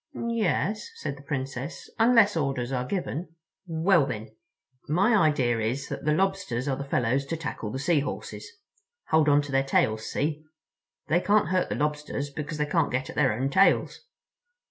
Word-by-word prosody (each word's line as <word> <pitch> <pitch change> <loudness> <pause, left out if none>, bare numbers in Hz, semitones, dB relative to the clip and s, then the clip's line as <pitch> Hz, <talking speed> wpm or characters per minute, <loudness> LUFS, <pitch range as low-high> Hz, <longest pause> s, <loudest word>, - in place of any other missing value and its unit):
"Yes," 220 - -1
said 455 - -5
the 140 - -13
Princess, 135 0 -5
"unless 225 -3 +5
orders 135 -5 -1
are 125 -1 -2
given." 170 -2 -4 0.3
"Well, 165 -2 +3
then—my 130 - -2
idea 135 - +2
is 120 +5 -2
that - - -5
the 150 - +3
Lobsters 175 -8 -1
are 135 - +1
the 140 - -5
fellows 130 -1 0
to 165 - -3
tackle 150 -8 -5
the 130 - -4
Sea 150 +3 +2
Horses. 145 - -5 0.6
Hold 155 -1 +4
on 145 0 +4
to 145 - -7
their 135 0 +3
tails, 110 -5 0
see? 150 +1 -1 0.6
They 170 - +3
can't 205 +3 +2
hurt 185 0 +1
the - - -1
Lobsters 150 -1 -2
because 150 +2 -5
they 150 - +1
can't 150 - +1
get 130 +1 -2
at - - -13
their 135 -3 +3
own 130 +6 -1
tails." 195 +6 +3
145 Hz, 170 wpm, -27 LUFS, 130-175 Hz, 0.6 s, unless